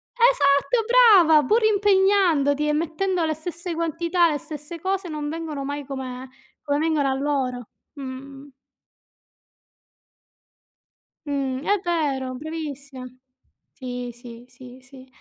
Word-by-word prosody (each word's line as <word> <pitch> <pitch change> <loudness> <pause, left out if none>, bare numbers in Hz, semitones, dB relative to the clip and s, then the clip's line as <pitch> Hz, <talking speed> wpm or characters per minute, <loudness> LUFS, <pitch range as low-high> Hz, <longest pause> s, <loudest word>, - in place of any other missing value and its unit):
esatto, 460 - +3
brava 390 - +6
pur 445 - +2
impegnandoti 385 -8 +3
e 300 - +1
mettendo 335 +3 -1
le 315 -1 -1
stesse 340 +2 -6
quantità, 335 +2 +1
le 295 - -2
stesse 305 +3 -9
cose 385 0 -2
non 300 -2 -4
vengono 315 -3 -5
mai 285 +1 -5
come 260 -1 -6 0.3
come 290 -1 0
vengono 310 -3 +1
a - - +1
loro. 265 -3 -2 0.3
Mh. 275 +1 -9 2.8
Mh, 275 -2 -2
è 410 0 +3
vero 280 -7 -1
bravissima. 285 -3 -7 0.7
Sì, 250 -2 -6
sì, 240 0 -12
sì, 255 0 -14
sì, 265 0 -15
295 Hz, 115 wpm, -23 LUFS, 270-345 Hz, 2.8 s, brava